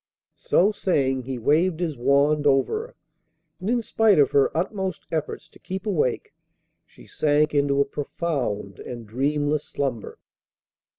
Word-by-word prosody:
So 195 +5 +4
saying, 140 -10 0
he 130 -1 -4
waved 160 +8 +2
his 165 -4 -2
wand 140 +4 +2
over 145 - +1
her, - - -22 0.6
and 190 +3 -4
in 240 -1 +1
spite 220 -2 +3
of 145 -3 +4
her 140 -1 +4
utmost 190 0 -3
efforts 160 0 -3
to - - -20
keep 190 +2 -6
awake 165 - -1 0.5
she - - -18
sank 150 0 +1
into 140 -1 +2
a - - +2
profound 135 - -3
and 120 -2 -8
dreamless 145 +6 -1
slumber. 130 -6 -4
150 Hz, 140 wpm, -24 LUFS, 135-180 Hz, 0.6 s, So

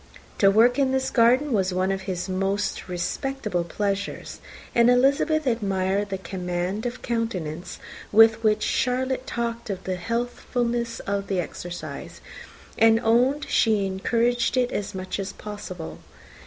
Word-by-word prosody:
To 195 - +6
work 235 +6 +4
in 270 -1 +3
his 265 0 0
garden 255 +4 +4
was 190 -3 +1
one 185 +1 +1
of 195 0 -2
his 180 0 -3
most 195 +1 -2
respectable 205 +2 -2
pleasures; 200 +3 -3 0.3
and 235 0 +5
Elizabeth 280 +5 +3
admired 200 -4 0
the 195 - -2
command 185 +3 -3
of 245 +1 -7
countenance 185 -9 -3 0.3
with 225 +1 +6
which 215 -1 +2
Charlotte 255 +1 0
talked 235 -1 -3
of 195 -2 -4
the 185 -1 -2
healthfulness 235 +2 -2
of 200 0 -2
the 190 -2 0
exercise, 175 0 -6 0.6
and 225 0 +6
owned 250 +6 +3
she 215 -3 +2
encouraged 235 +6 0
it 250 -1 +2
as 200 -1 -3
much 185 +1 -4
as 190 -1 -4
possible. 205 -5 -7
215 Hz, 140 wpm, -25 LUFS, 190-245 Hz, 0.6 s, To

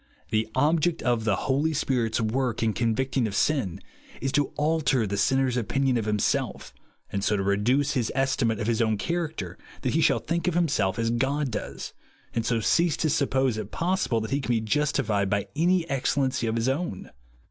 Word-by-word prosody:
The 110 0 +1
object 160 +4 +2
of 120 -3 +1
the 105 -3 +2
Holy 145 +4 +1
Sphit's 125 -6 0
work, 115 +1 -1
in 110 -1 +1
convincing 120 +2 0
of 100 - -5
sin, 130 - +1 0.4
is 135 - -2
to 145 +1 +2
alter 150 -5 +1
the 100 0 -2
sinner's 130 +4 +2
opinion 125 +4 +1
of 115 -3 0
himself, 105 -1 -1 0.4
and 100 0 -2
so 105 - +2
to 95 - -1
reduce 120 +9 +2
his 120 -4 0
estimate 130 -4 +1
of 110 - -2
his 115 +1 +1
own 110 -2 +2
character, 160 - -3 0.2
that - - 0
he - - +2
shall - - +4
think 170 +2 -2
of 180 - +1
himself 110 - +1
as 115 0 0
God 135 +3 0
does, 105 - -5 0.4
and 115 - 0
so 115 0 +1
cease 170 +7 +2
to 155 - +1
suppose 130 -5 +1
it 105 -1 -6
possible 175 - 0
that 110 - -5
he 140 +1 +1
can 120 -3 0
be - - +2
justified 110 -5 0
by 100 0 0
any 175 +2 +2
excellency 135 -3 0
of 110 - -1
his 115 +1 0
own. 135 - -2
125 Hz, 190 wpm, -26 LUFS, 110-145 Hz, 0.4 s, shall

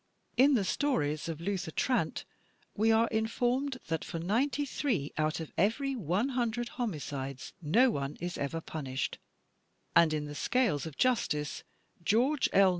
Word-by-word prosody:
In 275 +2 +6
the 215 - +2
stories 160 - 0
of 160 -2 -4
Luther 185 -1 -2
Trant, 250 - 0 0.5
we 220 +2 +3
are 225 +1 +4
informed 245 +5 0
"that 160 -1 -2
for - - -5
ninety 240 - +1
three 230 - -1
out 155 +1 0
of 160 - -6
every 265 - +1
one 205 - 0
himdred 240 -1 -1
homicides 140 - -4
no 230 - +4
one 140 -3 -3
is 175 +1 -3
ever 150 +4 -2
punished," 135 -5 -4 0.8
and 170 -2 +6
in 150 -1 -1
"The 145 - -6
Scales 170 - +1
of 155 - -9
Justice," 175 -12 +1 0.4
George 250 - +3
L. 195 -1 +6
200 Hz, 150 wpm, -31 LUFS, 155-245 Hz, 0.8 s, In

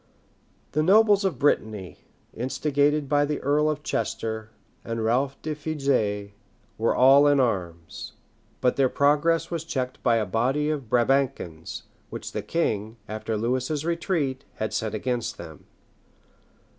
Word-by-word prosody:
The 155 - +1
nobles 205 +4 +5
of 190 -3 0
Brittany, 110 -9 0 0.3
instigated 145 +4 0
by 145 +1 +3
the 145 0 -1
earl 150 +2 +2
of 150 -1 -3
Chester 110 -2 -3 0.3
and 115 -1 -3
Ralph 130 +4 +1
de 155 - -2
Fougeres, 135 -10 -1 0.5
were 115 - +2
all 135 +3 +7
in 145 -1 +4
arms; 90 -9 -2 0.5
but 125 - +2
their 135 -2 +3
progress 155 +5 +2
was 165 -2 -2
checked 130 -6 -3
by 120 -2 +3
a 110 -2 +1
body 130 +9 0
of 140 -7 -4
Brabançons, 120 -10 0 0.3
which - - -6
the - - -3
king, 110 -9 -2
after 110 0 -3
Lewis's 130 +6 -1
retreat, 165 -6 -1
had 110 - -3
sent 110 -1 -2
against 120 +1 -2
them. - - -11
135 Hz, 135 wpm, -25 LUFS, 110-150 Hz, 0.5 s, all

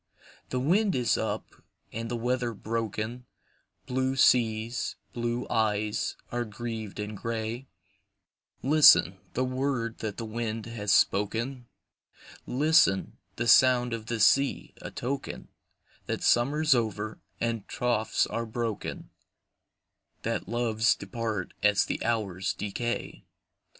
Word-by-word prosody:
The 125 - -1
wind 185 +7 +2
is 125 -3 +2
up, - - -2 0.5
and 115 +1 -4
the 120 - -2
weather 120 0 -1
broken, 115 +2 -3 0.6
Blue 130 +1 0
seas, 115 -2 +2 0.2
blue 120 +1 -2
eyes, 105 -2 0 0.2
are 120 0 -1
grieved 110 -1 -6
and 105 +1 -4
grey, 115 +4 -4 1.0
Listen, 150 +3 +6
the 130 - 0
word 130 -3 -2
that 110 -2 -4
the 115 - -4
wind 110 0 -3
has 110 -3 -3
spoken, 115 +7 +1 0.8
Listen, 145 - +3 0.2
the 120 - -2
sound 125 -1 +5
of 110 -1 -5
the 120 -1 -2
sea,—a 135 +6 +2
token 140 0 -5 0.6
That - - -3
summer's 145 +5 +4
over, 110 -3 -2 0.2
and 115 -3 -2
troths 120 -3 +1
are 115 0 -3
broken,— 115 -1 -4 1.1
That - - -2
loves 115 -1 +2
depart 105 -1 -4
as 105 -1 +4
the - - -3
hours 100 -5 -1
decay. 120 +4 -4
115 Hz, 115 wpm, -28 LUFS, 110-125 Hz, 1.1 s, Listen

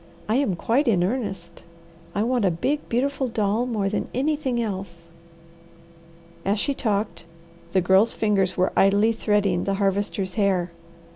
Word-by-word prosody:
I 220 +3 +2
am 265 -10 +1
quite 250 - +1
in 190 -7 +3
earnest. 190 -6 -3 0.5
I 205 - +1
want 245 0 +1
a 190 - +4
big, 270 - -2
beautiful 265 +2 0
doll 225 +1 0
more 215 -5 -1
than 205 - -2
anything 270 -2 0
else." 190 -6 -5 1.3
As 200 +2 0
she 280 - 0
talked 205 -8 -2 0.5
the 190 - +3
Girl's 190 +5 +4
fingers 195 -4 +1
were 185 0 +1
idly 205 +3 +4
threading 205 -5 +1
the 195 - 0
Harvester's 195 -1 -1
hair. 190 -5 +1
205 Hz, 145 wpm, -24 LUFS, 190-235 Hz, 1.3 s, a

